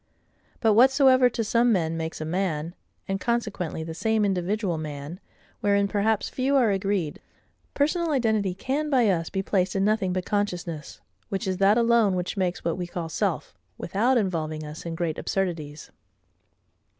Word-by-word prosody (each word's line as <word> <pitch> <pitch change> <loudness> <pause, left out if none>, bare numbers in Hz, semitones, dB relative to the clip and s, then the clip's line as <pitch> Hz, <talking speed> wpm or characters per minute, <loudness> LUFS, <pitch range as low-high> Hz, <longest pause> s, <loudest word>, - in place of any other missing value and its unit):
But 225 -2 +4
whatsoever 260 +1 +6
to 230 -1 -2
some 235 +2 +3
men 165 -5 +1
makes 160 0 -4
a 155 - -4
man, 165 -2 -2 0.3
and 195 0 -2
consequently 210 -9 -2
the 160 0 -6
same 215 +5 +1
individual 190 -1 -1
man, 150 +2 -6 0.4
wherein 200 0 +2
perhaps 210 +1 0
few 270 +2 0
are 245 -6 +4
agreed, 195 -5 -1 0.5
personal 330 +4 +1
identity 220 -9 +1
can 285 +9 -2
by 255 -5 +3
us 165 -3 -1
be 195 -1 -2
placed 185 -1 0
in 195 0 +2
nothing 210 -3 +1
but 180 0 -2
consciousness, 175 -7 -3 0.3
(which 195 +3 -2
is 185 -1 -1
that 195 +3 +4
alone 230 -4 +3
which 180 +3 -3
makes 185 -2 -2
what 170 +1 -1
we 175 - -3
call 170 -1 -5
SELF,) - - -2 0.2
without 240 +6 +1
involving 160 -7 -2
us 150 +3 -8
in 165 - -4
great 165 -2 -2
absurdities. 165 -6 -3
195 Hz, 160 wpm, -25 LUFS, 170-225 Hz, 0.5 s, whatsoever